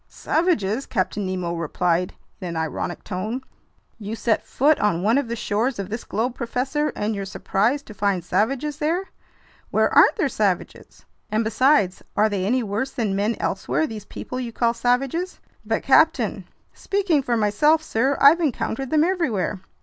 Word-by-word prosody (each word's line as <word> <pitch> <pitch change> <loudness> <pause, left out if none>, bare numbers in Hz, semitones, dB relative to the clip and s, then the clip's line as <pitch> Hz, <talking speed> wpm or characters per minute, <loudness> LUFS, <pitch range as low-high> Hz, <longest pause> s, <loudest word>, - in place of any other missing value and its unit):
"Savages!" 275 - 0
Captain 190 +1 -1
Nemo 180 -2 -2
replied 170 +2 -1 0.2
in 185 - -5
an 170 -1 -4
ironic 160 +2 -3
tone. 215 +7 -4 0.6
"You 210 +1 -5
set 230 -1 0
foot 295 +3 +3
on 180 -4 +1
one 225 +6 +3
of 280 - -3
the 235 - -3
shores 225 +3 -1
of 195 -1 -5
this 225 +2 -4
globe, 235 +5 -2
professor, 265 +5 -1
and 210 +1 -1
you're 200 -1 -3
surprised 215 +8 -1
to 215 - -10
find 200 -3 0
savages 275 +7 0
there? 340 +6 -1 0.6
Where - - +2
aren't - - +6
there 365 -9 +1
savages? 200 -8 -2 0.2
And 215 +2 +1
besides, 225 -3 +2 0.2
are 215 +1 +4
they 195 -3 -1
any 250 +3 +1
worse 215 +6 -2
than 220 -7 -2
men 210 +3 0
elsewhere, 315 - -1
these 220 -7 -7
people 255 - -6
you 240 -2 -4
call 235 0 +1
savages?" 270 +10 -1 0.2
"But - - -1
captain—" - - +3 0.3
"Speaking 385 -7 0
for 240 -3 0
myself, 295 +10 +3
sir, 265 +1 0
I've 295 +5 +7
encountered 270 -3 -1
them 310 +1 +3
everywhere." 255 - -1
230 Hz, 165 wpm, -23 LUFS, 200-275 Hz, 0.6 s, I've